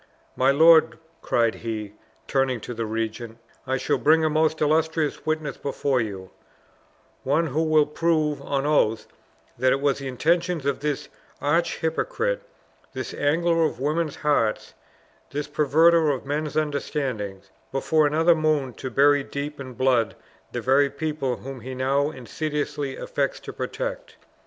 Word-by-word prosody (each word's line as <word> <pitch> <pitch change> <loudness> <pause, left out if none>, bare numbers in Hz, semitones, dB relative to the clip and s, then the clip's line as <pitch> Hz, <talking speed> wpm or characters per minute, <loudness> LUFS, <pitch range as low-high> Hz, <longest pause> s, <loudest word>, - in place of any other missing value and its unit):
My 130 +1 +3
lord," 160 +3 +6 0.2
cried 115 -1 +2
he, 110 -3 -5 0.3
turning 135 -3 +1
to 120 - -6
the 115 -1 -3
regent, 110 +1 -4 0.3
"I 130 0 +1
shall - - 0
bring 160 +1 +4
a 155 - +1
most 155 0 +2
illustrious 160 0 0
witness 155 -3 -1
before 140 -2 0
you; 95 -4 -6 0.9
one 150 +5 +1
who 155 +1 -1
will 155 -2 +4
prove 150 -1 0
on 140 0 -2
oath 115 -7 +2 0.5
that 130 0 +3
it 135 - +2
was 140 -1 +1
the 135 - -5
intention 165 +3 0
of 140 - 0
this 150 0 -2 0.3
arch 165 +4 +1
hypocrite, 450 - -1 0.5
this - - -5
angler 165 +2 +2
for - - -15
women's 150 +2 -1
hearts, 145 -8 0 0.6
this 145 +1 -4
perverter 155 +2 +4
of 135 -2 -2
men's 150 +1 -2
understandings, 130 -10 -3 0.2
before 150 +3 +2
another 160 +3 +4
moon 155 -5 0
to 130 - -6
bury 140 +3 +4
deep 140 +2 -5
in 130 -2 -7
blood 125 -4 +2 0.4
the - - -3
very 140 +2 +3
people 140 -3 -2
whom 130 +4 -8
he 130 +3 -7
now 135 +3 +1
insidiously 145 0 -4
affects - - -2
to - - -8
protect! - - -5
145 Hz, 145 wpm, -24 LUFS, 130-155 Hz, 0.9 s, lord